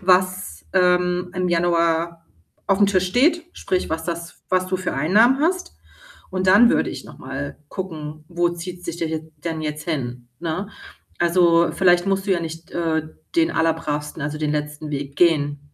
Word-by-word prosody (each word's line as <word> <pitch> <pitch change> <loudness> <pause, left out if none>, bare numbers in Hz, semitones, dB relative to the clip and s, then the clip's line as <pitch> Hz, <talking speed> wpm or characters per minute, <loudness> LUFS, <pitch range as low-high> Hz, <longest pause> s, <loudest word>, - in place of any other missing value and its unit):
was, 185 - +1
ähm, 180 -1 +2
im 185 -1 -1
Januar 170 -1 +1 0.4
auf'm 200 +1 +4
Tisch 185 -2 +2
steht, 315 - +3
sprich 185 -2 -2
was 160 0 -2
das 170 0 -6
was 185 0 +1
du 185 0 -1
für 185 0 -3
Einnahmen 210 - +4
hast 365 +4 0 0.5
und 185 0 -1
dann 215 +6 +7
würde - - +1
ich - - -7
noch - - -13
mal - - -5
gucken, 155 -5 -6
wo 175 0 +1
zieht 175 +1 -7
sich 170 - -4
der 170 - -1
jet 160 0 -5
denn 165 -2 -2
jetzt 150 +1 -4
hin, 125 -6 -3
ne? 175 +4 -3 0.5
Also, 170 -1 +4
vielleicht 175 -1 +4
musst 195 0 0
du - - 0
ja 175 - +1
nicht, 165 0 -7
äh, 165 -2 0 0.3
den 335 0 +4
allerbravsten 150 - -1
also, 150 +1 -3
den 150 -1 0
letzten 150 +1 -3
Weg 140 -1 -4
gehen. 145 -4 +3
170 Hz, 170 wpm, -22 LUFS, 155-185 Hz, 0.5 s, dann